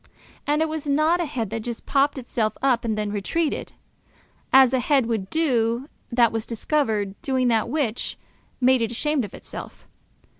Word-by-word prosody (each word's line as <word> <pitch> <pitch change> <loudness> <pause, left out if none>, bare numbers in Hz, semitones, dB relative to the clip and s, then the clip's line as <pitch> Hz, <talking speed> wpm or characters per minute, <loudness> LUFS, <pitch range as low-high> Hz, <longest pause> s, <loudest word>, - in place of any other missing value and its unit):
And 300 +2 +2
it - - 0
was 310 -1 -5
not 310 +5 +3
a - - 0
head 235 -8 -3
that 225 - -2
just 235 +1 -6
popped 280 +1 +2
itself 235 -3 -2
up 255 -4 +3
and 220 -2 -1
then 210 -1 -2
retreated, 290 +11 -2 0.8
as 265 -1 +7
a 260 - +3
head 270 0 +2
would 220 -5 -2
do 255 -4 +1 0.2
that 235 -1 +4
was 225 0 -3
discovered 220 -5 0
doing 260 -2 +1
that 225 0 +1
which 255 -5 -1 0.4
made 255 -1 +4
it 225 - 0
ashamed 295 +3 0
of 205 - -7
itself. - - -10
250 Hz, 175 wpm, -24 LUFS, 225-290 Hz, 0.8 s, as